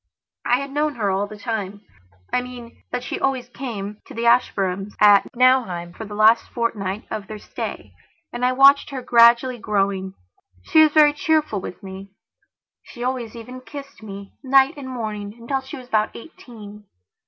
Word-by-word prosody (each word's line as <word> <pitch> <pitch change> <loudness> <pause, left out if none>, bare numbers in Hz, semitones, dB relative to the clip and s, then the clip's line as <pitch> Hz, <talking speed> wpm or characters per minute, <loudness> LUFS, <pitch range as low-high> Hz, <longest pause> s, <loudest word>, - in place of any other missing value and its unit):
I 245 +1 +3
had 275 0 -6
known 295 0 0
her 205 -4 0
all 195 +2 0
the 215 - -10
timeI 205 -2 -4 0.6
mean, 245 -2 -11
that 245 - -3
she - - -4
always 260 -2 -1
came 210 -6 -6
to 275 - -11
the 230 +1 -2
Ashburnhams' 200 -5 +1
at 205 -1 +6
Nauheim 235 -9 +2
for 220 - -8
the 205 0 -8
last 220 +2 +4
fortnight 210 -4 -3
of 215 -3 -5
their 215 - -7
stayand - - -7 0.4
I 250 +1 +1
watched 275 +2 +6
her 265 -3 -6
gradually 235 +1 +5
growing. 195 -2 -1 0.5
She 315 - +5
was 310 -1 +5
very 295 -1 +6
cheerful 300 - 0
with 185 - -8
me. 190 +1 -9 0.7
She 240 - -10
always 245 -3 -3
even 250 +2 -9
kissed 280 0 -10
me, 200 -2 -9
night 270 0 +4
and 275 -3 -8
morning, 215 -4 -5
until 265 +3 -2
she 270 +3 -9
was 250 -1 -12
about 215 -1 0
eighteen. 210 -6 -12
235 Hz, 165 wpm, -22 LUFS, 205-260 Hz, 0.7 s, at